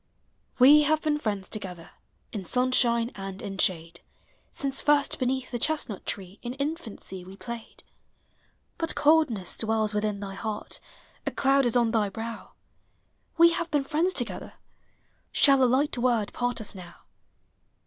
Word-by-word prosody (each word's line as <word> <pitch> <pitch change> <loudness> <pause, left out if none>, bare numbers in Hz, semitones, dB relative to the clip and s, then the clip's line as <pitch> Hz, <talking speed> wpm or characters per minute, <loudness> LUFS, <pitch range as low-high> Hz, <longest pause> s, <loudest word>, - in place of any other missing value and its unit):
We 285 +4 +8
have 310 +1 +1
been 300 -1 +1
friends 205 -7 -2
together 180 -5 -6 0.4
In 205 -4 -4
sunshine 240 +2 +2
and 195 -1 -7
in 195 0 -6
shade, 170 -1 +1 0.5
Since 275 -4 -2
first 290 -1 +2
beneath 255 0 -1
the 240 - -3
chestnut 295 -8 -2
tree 195 0 -5
In 245 +1 -5
infancy 275 - -5
we 190 +2 -12
played. 235 +1 -9 1.0
But 330 - -1
coldness 285 - +2
dwells 220 -1 0
within 210 -1 -1
thy 200 -1 -6
heart, 210 +1 -5 0.5
A - - +1
cloud 275 -1 +3
is 235 - 0
on 235 -2 +3
thy 215 -3 +1
brow; 225 +3 -7 0.8
We 335 +1 +7
have 335 0 -2
been 295 -3 +1
friends 325 +7 +1
together, - - -2 0.8
Shall 275 -2 +5
a - - +6
light 265 +4 +2
word 235 -4 +1
part 245 0 -1
us 220 - -2
now? 180 -3 -12
235 Hz, 150 wpm, -27 LUFS, 205-280 Hz, 1.0 s, We